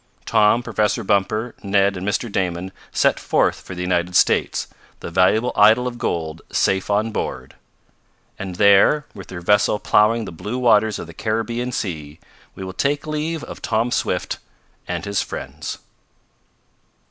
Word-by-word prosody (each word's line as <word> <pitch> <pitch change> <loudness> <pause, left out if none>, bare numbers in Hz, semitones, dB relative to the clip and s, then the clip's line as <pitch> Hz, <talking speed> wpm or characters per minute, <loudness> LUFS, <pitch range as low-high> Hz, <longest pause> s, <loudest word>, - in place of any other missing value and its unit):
Tom, 105 +3 +3
Professor 110 0 0
Bumper, 110 +3 0
Ned 100 0 +2
and 95 +1 -5
Mr. 105 +4 0
Damon 90 -1 -2 0.2
set - - +2
sail - - +2
for 95 - -10
the 90 - -4
United 90 0 0
States, - - +2 0.3
the - - -7
valuable 95 +7 +3
idol 110 +4 +5
of 120 -1 -6
gold 80 -4 -3
safe 95 +1 +1
on 105 +2 +1
board. 65 -10 -4 0.9
And 95 -2 -5
there, 100 +10 +5
with 95 -3 -10
their 90 -2 -7
vessel 105 +3 +3
plowing 110 +2 +3
the - - -7
blue 105 +8 -5
waters 110 -3 +3
of - - -6
the 85 - -12
Caribbean 115 +4 -2
Sea, 80 -9 -5 0.4
we 95 - -7
will 95 0 -6
take 145 +6 0
leave 155 +1 -3
of - - -9
Tom 115 +2 0
Swift - - -1 0.5
and 90 +1 -3
his 100 0 0
friends. - - -6
105 Hz, 155 wpm, -21 LUFS, 90-115 Hz, 0.9 s, idol